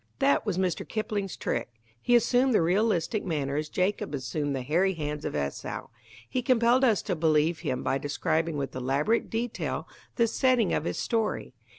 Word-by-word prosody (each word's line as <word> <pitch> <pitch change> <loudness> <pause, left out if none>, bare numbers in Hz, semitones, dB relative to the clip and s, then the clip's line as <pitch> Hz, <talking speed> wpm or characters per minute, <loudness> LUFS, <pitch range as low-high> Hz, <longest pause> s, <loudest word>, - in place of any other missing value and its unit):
That 275 -4 +2
was 190 -4 0
Mr. 185 -3 0
Kipling's 210 -3 -3
trick. 120 0 -2 0.3
He 245 - +3
assumed 245 +1 +3
the - - +5
realistic 205 +2 +1
manner 145 -6 -2
as 155 +1 -2
Jacob 185 -5 -1
assumed 140 +2 -2
the 130 - -3
hairy 175 +8 +2
hands 150 -1 -4
of - - -3
Esau. 70 -1 -4 0.4
He 255 - -1
compelled 245 0 +3
us 225 -6 +3
to 185 - -1
believe 160 0 +2
him 130 -6 -2
by 135 - 0
describing 155 +3 -1
with 135 -2 -3
elaborate 135 - 0
detail 230 +1 -3 0.3
the 235 - +4
setting 240 -2 +2
of - - 0
his - - -2
story. 225 - -1
175 Hz, 175 wpm, -28 LUFS, 145-225 Hz, 0.4 s, the